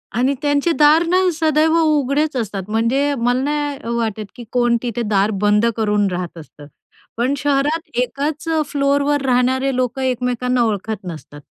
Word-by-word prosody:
आणि 255 +4 +2
त्यांचे 290 +3 +1
दार 305 +3 +6
ना 360 +2 +2 0.2
सदैव 315 0 +2
उघडेच 295 0 +1
असतात, 200 -4 -4
म्हणजे 245 +6 +1
मला 245 +2 +1
नाही 285 -5 -2
वाटत, 220 -2 -2
की 245 - -9
कोण 240 -1 +2
तिथे 240 -1 -3
दार 205 0 +2
बंद 210 +1 +3
करून 210 -2 +1
राहत 175 -1 -5
असतात. 150 -2 -13 0.5
पण 245 +4 +1
शहरात 290 +4 0
एकाच 285 +5 -3
अ, 320 -1 +1
फ्लोअरवर 285 0 +1
राहणारे 260 +1 +1
लोकं 255 +1 -1
एकमेकांना 250 -1 0
ओळखत 215 0 -3
नसतात. 155 -3 -9
255 Hz, 150 wpm, -19 LUFS, 225-290 Hz, 0.5 s, दार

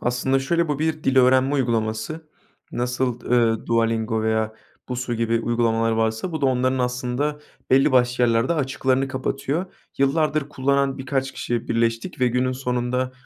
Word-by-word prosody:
Aslında 125 +2 +1
şöyle, 170 +4 0
bu 145 -1 -1
bir 155 0 -1
dil 135 0 +1
öğrenme 130 +2 +4
uygulaması. 120 +5 -2 0.4
Nasıl, 125 0 -1
ııı, 115 -2 +1
Duolingo 115 -1 +1
veya 110 0 0 0.4
Busuu 125 -1 -3
gibi 115 0 +1
uygulamalar 115 -1 +1
varsa 110 +9 -1
bu 160 - -3
da 140 - +2
onların 130 0 +1
aslında 125 +4 -1 0.3
belli 135 +2 +4
başlı 125 -1 +3
yerlerde 115 +6 +2
açıklarını 135 -2 0
kapatıyor. 135 +6 -2 0.3
Yıllardır 150 +1 +1
kullanan 140 -1 0
birkaç 135 0 -2
kişi 120 -1 -3
birleştik 115 +1 -1
ve 125 - +4
günün 125 +1 0
sonunda, 125 0 -2
125 Hz, 145 wpm, -23 LUFS, 115-135 Hz, 0.4 s, öğrenme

